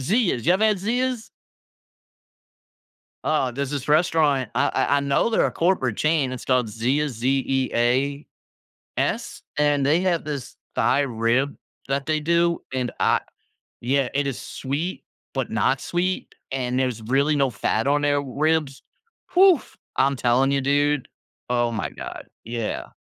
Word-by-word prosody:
Zea's. 175 Hz, -, +1 dB
You 175 Hz, -, +6 dB
ever 195 Hz, +4 st, +2 dB
had 215 Hz, -2 st, +3 dB
Zea's? 240 Hz, +3 st, -1 dB, 1.9 s
Oh, 150 Hz, -5 st, +1 dB
there's 140 Hz, +2 st, -3 dB
this 140 Hz, -3 st, -3 dB
restaurant, 150 Hz, -5 st, +3 dB
I -, -, +3 dB
I 145 Hz, -, +2 dB
I -, -, +2 dB
know 140 Hz, +10 st, +1 dB
they're 225 Hz, -, +3 dB
a -, -, -2 dB
corporate 165 Hz, -, +1 dB
chain, 155 Hz, -4 st, +1 dB
it's 130 Hz, -, -6 dB
called 125 Hz, -3 st, +2 dB
Zea, 125 Hz, +8 st, 0 dB
Z-E-A-S? 130 Hz, +2 st, 0 dB, 1.1 s
And 145 Hz, -2 st, +3 dB
they 155 Hz, +5 st, +3 dB
have 180 Hz, -3 st, +1 dB
this 145 Hz, -4 st, -5 dB, 0.2 s
Thai 135 Hz, -, +3 dB
rib 125 Hz, +1 st, 0 dB, 0.3 s
that 135 Hz, 0 st, -1 dB
they 155 Hz, -1 st, +1 dB
do, 170 Hz, +2 st, +1 dB
and, 125 Hz, -2 st, -2 dB
uh -, -, +4 dB, 0.6 s
Yeah. 130 Hz, +1 st, +1 dB
It 145 Hz, 0 st, +1 dB
is 135 Hz, -3 st, -3 dB
sweet, 145 Hz, +7 st, -4 dB, 0.3 s
but -, -, -2 dB
not -, -, +1 dB
sweet, 180 Hz, +2 st, -2 dB, 0.2 s
and 125 Hz, -1 st, -1 dB
there's 125 Hz, -4 st, -1 dB
really 140 Hz, +6 st, +2 dB
no 135 Hz, -2 st, +2 dB
fat 110 Hz, +2 st, -1 dB
on 145 Hz, +1 st, +3 dB
their 145 Hz, -1 st, +2 dB
ribs. 145 Hz, +1 st, 0 dB, 0.5 s
Oof! 370 Hz, -5 st, +5 dB, 0.2 s
I'm 135 Hz, +1 st, +2 dB
telling 125 Hz, +2 st, +2 dB
you, 140 Hz, -, +2 dB
dude, 145 Hz, 0 st, +1 dB, 0.4 s
oh 120 Hz, -1 st, +2 dB
my 100 Hz, -9 st, -3 dB
god. -, -, -8 dB, 0.2 s
Yeah. 115 Hz, -1 st, -3 dB
140 Hz, 145 wpm, -23 LUFS, 125-155 Hz, 1.9 s, You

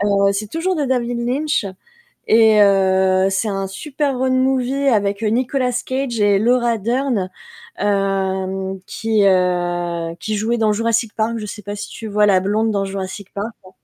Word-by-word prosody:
Heu, 200 Hz, -1 st, +2 dB
c'est 205 Hz, +1 st, -3 dB
toujours 355 Hz, +5 st, -1 dB
de 295 Hz, -, 0 dB
David 245 Hz, -2 st, -1 dB
Lynch, 285 Hz, -3 st, 0 dB, 0.6 s
et 220 Hz, -1 st, +5 dB
heu, 190 Hz, -1 st, +3 dB
c'est 195 Hz, +3 st, -1 dB
un 195 Hz, -1 st, -2 dB
super 275 Hz, +6 st, -3 dB
road 260 Hz, 0 st, 0 dB
movie 265 Hz, +1 st, +1 dB
avec 205 Hz, -3 st, +1 dB
Nicolas 250 Hz, +3 st, 0 dB
Cage 260 Hz, -3 st, -2 dB
et 205 Hz, -1 st, +3 dB
Laura 240 Hz, +1 st, +2 dB
Durn, 235 Hz, -2 st, -1 dB, 0.5 s
hem, 190 Hz, -1 st, -1 dB
qui, 220 Hz, -2 st, 0 dB
heu, 175 Hz, -2 st, 0 dB
qui 215 Hz, 0 st, -3 dB
jouait 225 Hz, +3 st, 0 dB
dans 220 Hz, -2 st, +2 dB
Jurassic 230 Hz, +1 st, 0 dB
Park. 220 Hz, +1 st, 0 dB
Je 215 Hz, -, -5 dB
sais 210 Hz, +1 st, -7 dB
pas 205 Hz, 0 st, -5 dB
si 205 Hz, 0 st, -6 dB
tu 225 Hz, -, -8 dB
vois 210 Hz, 0 st, +2 dB
la 195 Hz, -2 st, +4 dB
blonde 215 Hz, +4 st, 0 dB
dans 200 Hz, -1 st, -1 dB
Jurassic 195 Hz, 0 st, -6 dB
Park. 205 Hz, +3 st, -3 dB
Ouais, 185 Hz, -, -14 dB
210 Hz, 170 wpm, -19 LUFS, 195-240 Hz, 0.6 s, et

